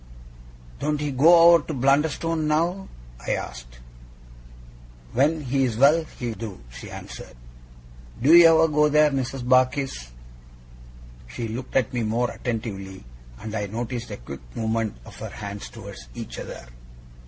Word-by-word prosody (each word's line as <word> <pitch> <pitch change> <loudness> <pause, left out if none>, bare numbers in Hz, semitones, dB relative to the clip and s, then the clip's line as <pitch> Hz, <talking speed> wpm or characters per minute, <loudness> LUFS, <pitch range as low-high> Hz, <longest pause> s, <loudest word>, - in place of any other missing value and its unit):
'Don't 150 0 -1
he 150 -1 -2
go 165 +5 +7
over 165 -3 +4
to 155 - -3
Blunderstone 150 +4 +1
now?' 170 +5 0 0.4
I - - +1
asked. - - -8 1.4
'When 155 +5 +2
he's 130 -4 0
well 150 +6 +5
he 120 -2 -3
do,' 110 -4 -8
she - - -10
answered. - - -10 0.8
'Do 140 +7 +4
YOU 170 -1 +10
ever 160 0 +5
go 150 -1 +3
there, 150 0 +4
Mrs. 130 -1 -3
Barkis?' 130 - +1 1.2
She 115 - -5
looked 120 +4 -7
at 130 -3 +1
me 120 - -1
more 115 +3 0
attentively, 100 - -5 0.4
and 110 0 -7
I 105 -2 -2
noticed 120 +3 -5
a - - -6
quick 65 +3 -9
movement 110 -1 -1
of - - -13
her - - -6
hands 100 0 -7
towards 60 0 -11
each - - -7
other. - - -8
130 Hz, 140 wpm, -24 LUFS, 110-150 Hz, 1.4 s, YOU